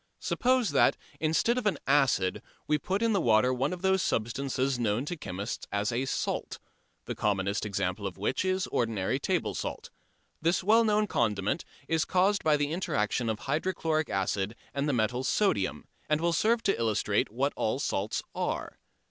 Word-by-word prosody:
Suppose 255 -4 +1
that, - - +4 0.2
instead 160 +10 +2
of 225 - -1
an 205 - +1
acid, 135 -10 +2 0.2
we 150 - +1
put 195 +8 -1
in 230 -1 +3
the 195 - +2
water 120 +1 +4
one 130 +3 0
of 180 0 -6
those 190 0 +3
substances 130 +2 -1
known 115 +2 0
to 175 - -3
chemists 100 - -5
as 100 +3 0
a 125 +3 -1
"salt," - - -2 0.5
the - - -3
commonest 100 0 0
example 100 0 -2
of 95 - -8
which 100 - -1
is 185 0 0
ordinary 110 -6 0
table - - 0
salt. - - -5 0.5
This 170 +3 +1
well 220 +4 +5
known 215 -1 +3
condiment 110 - 0 0.2
is 160 -1 +2
caused 195 +3 +2
by 155 -1 +4
the 145 0 -1
interaction 120 - 0
of 110 -1 -2
hydrochloric 155 +1 -1
acid 95 +2 -1 0.2
and 140 +1 -1
the - - +1
metal 120 +2 0
sodium 100 - +1 0.2
and 150 0 +3
will 170 +1 +1
serve 225 +6 +2
to 195 - +1
illustrate 110 -3 +1
what 135 +5 0
all 110 - 0
salts 105 -7 -2
are. - - -3
135 Hz, 175 wpm, -29 LUFS, -, 0.5 s, well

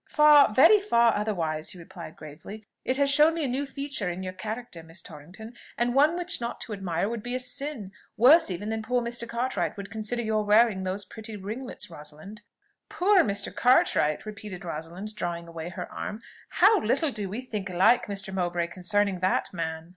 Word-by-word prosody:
"Far, 300 -4 +6
very 325 - +7
far 235 - +3
otherwise," 165 -7 -2
he - - -7
replied 170 -1 -10
gravely. 165 +8 -11 0.2
"It 260 - 0
has 280 -1 +3
shown 300 +3 +5
me 330 - -2
a - - 0
new 270 +3 -2
feature 275 -8 -3
in 180 +2 -5
your 185 0 -5
character, 220 -2 -6
Miss 165 +2 -9
Torrington, 175 +9 -10 0.2
and 240 0 +1
one 300 +6 +4
which 355 -6 -3
not 235 0 -4
to 220 - -4
admire 195 -2 -2
would 230 0 -4
be 245 +3 -4
a - - -1
sin, 255 -4 -4 0.3
worse 280 +7 +6
even 190 +4 -4
than 220 0 -2
poor 250 +3 0
Mr. 235 0 -3
Cartwright 240 -1 -2
would 200 -1 -8
consider 225 +2 -2
your 215 -1 0
wearing 210 -1 +4
these 190 +2 -3
pretty 220 -1 -7
ringlets, 215 +2 -6
Rosalind." 155 +8 -10 0.5
"Poor 390 +2 +3
Mr. 200 -1 -2
Cartwright!" 185 - +3
repeated 205 -3 -8
Rosalind, 170 +6 -6
drawing 170 -4 -4
away 165 0 -7
her 175 - -6
arm. 210 +1 -5 0.3
"How 410 +3 +5
little 275 +7 +1
do 205 -5 -3
we 215 +6 -4
think 210 -6 -5
alike, 185 +7 +3
Mr. 195 -1 -2
Mowbray, 175 -2 -1
concerning 190 +2 +1
that 185 +2 0
man!" 160 -1 -4
210 Hz, 190 wpm, -27 LUFS, 180-245 Hz, 0.5 s, very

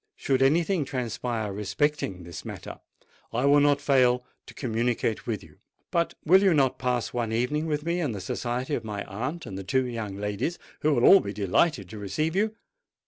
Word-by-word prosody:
Should 135 -1 0
anything 165 +5 +3
transpire 120 -5 -3
respecting 105 -2 -1
this 85 -1 -8
matter, - - -8 0.5
I 120 +4 0
will 145 +1 +6
not 145 0 +4
fail 125 -3 +3 0.2
to - - -12
communicate 120 -2 -1
with 105 -4 -2
you. 95 - -18 0.3
But 170 -2 0
will 190 +4 +6
you 190 -4 +4
not 135 -3 +2
pass 125 -2 -1
one 120 -2 -1
evening 125 +8 0
with 150 -1 -2
me 170 +1 0
in 150 -7 0
the 105 - -5
society 125 +8 -3
of 120 - -1
my 105 -2 -4
aunt 130 - -4
and 95 0 -6
the - - -6
two 130 +7 +1
young 110 -5 -4
ladies, 105 - -2 0.2
who 150 -1 +2
will 120 - +3
all 195 - +9
be 100 - -5
delighted 105 - +1
to 110 - -8
receive 155 - -2
you? 215 +2 +1
125 Hz, 195 wpm, -27 LUFS, 110-150 Hz, 0.5 s, all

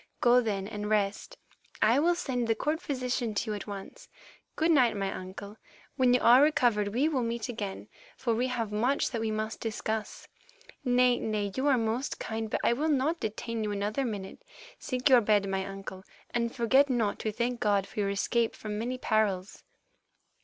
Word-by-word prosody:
Go, 245 +1 +5
then, 200 -4 -2
and 210 -1 -5
rest; 215 - -1 0.4
I 235 +5 +4
will 345 +3 +3
send 250 -7 -2
the 225 - +2
court 310 +7 -1
physician 250 -6 -2
to 215 +2 -1
you - - -2
at 205 - -7
once. 200 -1 -8 0.5
Good 325 +1 +2
night, 245 -8 +4
my 195 -1 -2
uncle; 195 +3 -8 0.4
when 255 -2 +4
you - - +3
are 245 +3 +7
recovered 240 -8 +3
we 245 +9 +1
will 285 -5 0
meet 230 -1 -3
again, 205 -5 -5 0.3
for 235 -3 0
we 245 +3 0
have 230 -4 -2
much 245 +7 +1
that 230 -3 -2
we 225 - -1
must 215 0 -3
discuss. 220 -1 -4 0.6
Nay, 250 -1 +3
nay, 210 -2 -2
you 265 +2 0
are 275 -3 +4
most 230 +4 -1
kind, 220 0 -4
but - - -2
I - - +4
will 300 +6 -1
not 300 +4 +1
detain 220 +1 -3
you 210 - -2
another 205 +6 -1
minute. 205 - -5 0.4
Seek 255 0 -1
your 255 -3 +7
bed, 205 -2 +2
my 190 0 -1
uncle, 195 -1 -8 0.3
and 235 -1 0
forget 265 +4 +3
not 230 -5 0
to 215 - -2
thank 235 +2 -2
God 200 -2 +2
for - - -8
your 200 -1 +1
escape 225 +3 0
from 210 -1 -5
many 245 +3 -3
perils." 210 -5 0
225 Hz, 190 wpm, -29 LUFS, 210-250 Hz, 0.6 s, are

